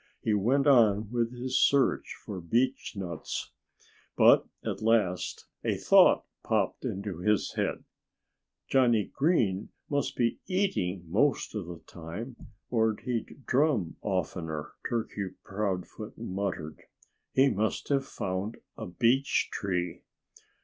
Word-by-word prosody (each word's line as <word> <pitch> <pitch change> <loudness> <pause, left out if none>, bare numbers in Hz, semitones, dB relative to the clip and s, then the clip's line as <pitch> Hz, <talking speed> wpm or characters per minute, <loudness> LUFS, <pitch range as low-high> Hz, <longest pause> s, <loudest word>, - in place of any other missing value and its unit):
He 110 - +2
went 125 +8 +2
on 110 -6 +4
with 120 -1 0
his 125 +1 -1
search 140 -2 +3
for 95 -3 -5
beechnuts. 95 - -2 0.7
But - - +6 0.2
at - - -3
last 110 -5 +1 0.2
a - - 0
thought - - +6 0.2
popped - - 0
into 100 -3 -4
his 105 +2 +1
head. - - -1 0.8
"Johnnie 120 -5 +3
Green 115 - +1 0.2
must 140 -1 0
be 115 -2 +1
eating 185 - 0
most 125 - +1
of 105 -6 -4
the 85 -2 -8
time, 95 +10 -7 0.4
or 110 -2 +2
he'd 125 +2 -4
drum 130 - +1
oftener," 80 -6 -3 0.2
Turkey 105 -4 -3
Proudfoot 100 0 -4
muttered. 95 -7 -4 0.5
"He 135 0 +5
must 110 +2 -1
have 140 -1 +2
found 95 +4 -3 0.2
a - - -6
beech 125 +8 +2
tree." 90 -3 -2
105 Hz, 115 wpm, -29 LUFS, 95-125 Hz, 0.8 s, But